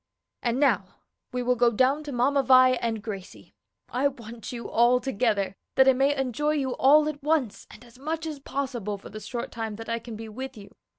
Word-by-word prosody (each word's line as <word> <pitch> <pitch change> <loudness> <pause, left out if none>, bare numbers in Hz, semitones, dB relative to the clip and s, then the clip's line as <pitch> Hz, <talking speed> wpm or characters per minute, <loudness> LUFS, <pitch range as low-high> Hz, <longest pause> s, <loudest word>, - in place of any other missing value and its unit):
And 240 +1 0
now 205 -10 +1 0.4
we 250 0 -2
will 250 +1 +3
go 240 0 +4
down 260 +6 +2
to 290 - -5
Mamma 270 +3 +2
Vi 255 -1 +6
and 230 -4 -2
Gracie. 195 -4 -8 0.4
I 260 +3 +1
want 235 -4 -8
you 235 -3 -6
all 240 +2 +4
together, 215 -7 0 0.2
that 265 0 +6
I 265 - +7
may 275 +3 +2
enjoy 270 +4 0
you 275 -4 -1
all 300 +3 +6
at 300 -1 -4
once 285 -7 0
and 240 - -14
as 240 +1 -18
much 320 +3 -3
as 305 -3 -5
possible 250 -7 -3
for 195 - -12
the 215 - -8
short 235 +2 -5
time 225 -2 -4
that 225 +2 -8
I 230 0 -1
can 230 -1 -9
be 225 +1 -7
with 260 +3 -7
you. 200 -1 -13
250 Hz, 215 wpm, -26 LUFS, 225-275 Hz, 0.4 s, I